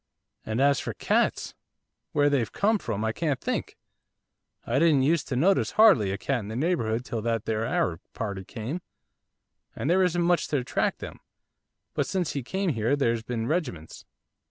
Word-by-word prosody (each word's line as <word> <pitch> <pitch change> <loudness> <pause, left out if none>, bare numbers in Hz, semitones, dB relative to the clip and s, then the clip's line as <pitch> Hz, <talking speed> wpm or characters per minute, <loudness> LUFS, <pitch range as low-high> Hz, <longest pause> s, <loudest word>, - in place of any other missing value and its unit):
And 110 +2 -3
as 140 0 +4
for - - -5
cats! - - 0 0.6
where 145 0 +3
they've 130 -7 +1
come 215 +1 +2
from 110 - -3
I 110 - +1
can't 145 +1 -1
think. - - -3 0.9
I 120 +4 +1
didn't 155 -5 +4
use 160 +3 +2
to 130 - -3
notice 185 +9 +2
hardly 200 - +6
a 95 - -2
cat 135 +3 -1
in 105 - -7
the 110 - -5
neighbourhood 120 -6 0
till 115 -3 -3
that 115 -1 -1
there 110 0 -1
Arab 85 -8 0 0.2
party 100 -4 -4
came, 120 - -5 0.9
there 175 +6 +2
isn't 180 -1 +2
much 175 0 +2
to 145 - 0
attract 125 - -1
them; - - -8 0.7
but - - -1
since 180 -4 -1
he 140 - -3
came 190 +6 -1
there's 115 0 +1
been 115 -1 -3
regiments. 125 - -3
130 Hz, 170 wpm, -27 LUFS, 110-165 Hz, 0.9 s, hardly